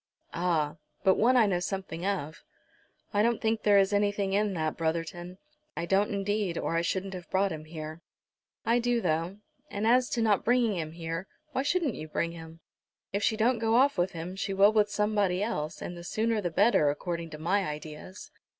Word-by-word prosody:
"Ah, 165 Hz, -4 st, 0 dB, 0.3 s
but 190 Hz, -1 st, +6 dB
one 250 Hz, +6 st, +3 dB
I 230 Hz, -, +6 dB
know 185 Hz, -4 st, +1 dB
something 185 Hz, -1 st, -4 dB
of." 165 Hz, -6 st, -3 dB, 0.7 s
"I 205 Hz, -, +3 dB
don't 235 Hz, +1 st, +2 dB
think 225 Hz, 0 st, 0 dB
there 205 Hz, -1 st, +5 dB
is 195 Hz, +1 st, +3 dB
anything 205 Hz, -1 st, +1 dB
in 205 Hz, -1 st, +1 dB
that, 155 Hz, -2 st, -1 dB
Brotherton; 170 Hz, +2 st, -3 dB, 0.4 s
I 170 Hz, -, -1 dB
don't, 195 Hz, +3 st, +2 dB
indeed, 200 Hz, -2 st, -1 dB
or -, -, -1 dB
I 165 Hz, -, +2 dB
shouldn't 190 Hz, +3 st, -2 dB
have 180 Hz, -2 st, -8 dB
brought 195 Hz, +1 st, +1 dB
him 155 Hz, -1 st, -6 dB
here." 155 Hz, 0 st, -7 dB, 0.6 s
"I 230 Hz, +2 st, +3 dB
do, 240 Hz, 0 st, +1 dB
though. 170 Hz, 0 st, -1 dB, 0.3 s
And 205 Hz, +2 st, -3 dB
as 245 Hz, +2 st, +4 dB
to 235 Hz, -, 0 dB
not 210 Hz, -3 st, +2 dB
bringing 240 Hz, -3 st, +2 dB
him 160 Hz, -2 st, -4 dB
here, 165 Hz, +2 st, -5 dB, 0.2 s
why 265 Hz, -, 0 dB
shouldn't 300 Hz, -2 st, +1 dB
you 155 Hz, -, -7 dB
bring 165 Hz, +2 st, -1 dB
him? 165 Hz, 0 st, -11 dB, 0.5 s
If 200 Hz, -, 0 dB
she 220 Hz, +1 st, +1 dB
don't 235 Hz, +2 st, +2 dB
go 225 Hz, 0 st, +2 dB
off 275 Hz, +3 st, +4 dB
with 180 Hz, +1 st, 0 dB
him, 170 Hz, +2 st, -6 dB
she 195 Hz, 0 st, -3 dB
will 200 Hz, +2 st, +6 dB
with 210 Hz, -1 st, +3 dB
somebody 205 Hz, -3 st, +1 dB
else, 155 Hz, -9 st, -3 dB
and 175 Hz, -, -5 dB
the 170 Hz, -, -9 dB
sooner 220 Hz, +4 st, 0 dB
the 175 Hz, -, -1 dB
better, 170 Hz, -4 st, +4 dB
according 170 Hz, +3 st, -3 dB
to 155 Hz, -, -8 dB
my 185 Hz, +6 st, +1 dB
ideas." 155 Hz, -, -8 dB
195 Hz, 200 wpm, -29 LUFS, 165-215 Hz, 0.7 s, but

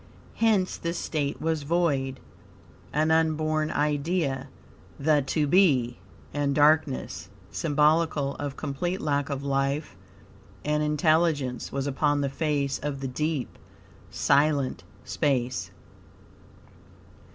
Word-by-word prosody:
Hence 215 Hz, -5 st, +2 dB
this 170 Hz, +1 st, -3 dB
state 145 Hz, -4 st, -2 dB
was 160 Hz, -1 st, -1 dB
void, 140 Hz, -4 st, 0 dB, 0.7 s
an 155 Hz, +2 st, +1 dB
unborn 155 Hz, -1 st, +1 dB
idea, 150 Hz, -2 st, -1 dB, 0.5 s
the 150 Hz, 0 st, +3 dB
To 150 Hz, +3 st, 0 dB
Be, 140 Hz, -8 st, +3 dB, 0.3 s
and 140 Hz, -1 st, 0 dB
darkness, 150 Hz, -2 st, +2 dB, 0.2 s
symbolical 150 Hz, -1 st, +2 dB
of 140 Hz, -2 st, -5 dB
complete 175 Hz, +7 st, -2 dB
lack 145 Hz, -1 st, 0 dB
of 140 Hz, -1 st, -3 dB
life 140 Hz, +2 st, -1 dB, 0.7 s
and 150 Hz, 0 st, +1 dB
intelligence, 150 Hz, -3 st, +1 dB
"was 135 Hz, 0 st, -2 dB
upon 145 Hz, +1 st, +1 dB
the 140 Hz, -, 0 dB
face 140 Hz, -1 st, -1 dB
of 145 Hz, -1 st, -4 dB
the 135 Hz, -, -3 dB
deep," 150 Hz, +1 st, -3 dB, 0.5 s
silent 140 Hz, -, +2 dB, 0.2 s
space. 130 Hz, -5 st, -1 dB
145 Hz, 105 wpm, -26 LUFS, 140-155 Hz, 0.7 s, the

